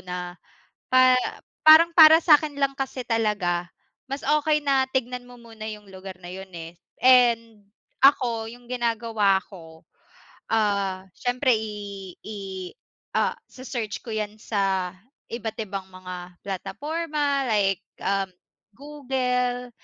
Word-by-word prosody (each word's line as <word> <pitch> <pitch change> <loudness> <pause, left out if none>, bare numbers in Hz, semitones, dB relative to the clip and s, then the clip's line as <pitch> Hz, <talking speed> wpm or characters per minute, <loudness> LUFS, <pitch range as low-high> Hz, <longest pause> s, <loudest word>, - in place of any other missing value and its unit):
na 180 -1 -6 0.6
pa 255 0 +6 0.5
parang 325 +2 +9
para 320 -1 +9
sa'kin 300 -2 +4
lang 275 -1 +1
kasi 265 -1 -4
talaga 205 -7 0 0.4
mas 275 +1 -4
okey 300 0 +2
na 270 -2 +3
tignan 250 -1 -2
mo 245 - -13
muna 225 -2 -11
yung 210 -1 -9
lugar 190 -1 -9
na 175 - -10
yun, 190 +1 -8
eh. 165 +1 -9 0.2
And 235 -4 +4 0.4
ako 235 -5 +4
yung 245 0 -15
ginagawa 230 -5 +1
ko, 160 -4 -13 0.7
ah, 200 -4 0
siyempre 250 +1 +1
i 205 -3 -7
i 215 0 -7 0.8
ah, - - +1
se-search 240 -5 -5
ko 230 - -7
yan 215 -1 -3
sa 190 -4 -1 0.4
iba't 225 -2 -4
ibang 195 -2 -6
mga 180 -1 -9
plataporma 285 - -2
like, 195 -3 +1 0.2
um, 195 0 0 0.5
Google. 250 -3 -2
225 Hz, 120 wpm, -25 LUFS, 195-260 Hz, 0.8 s, parang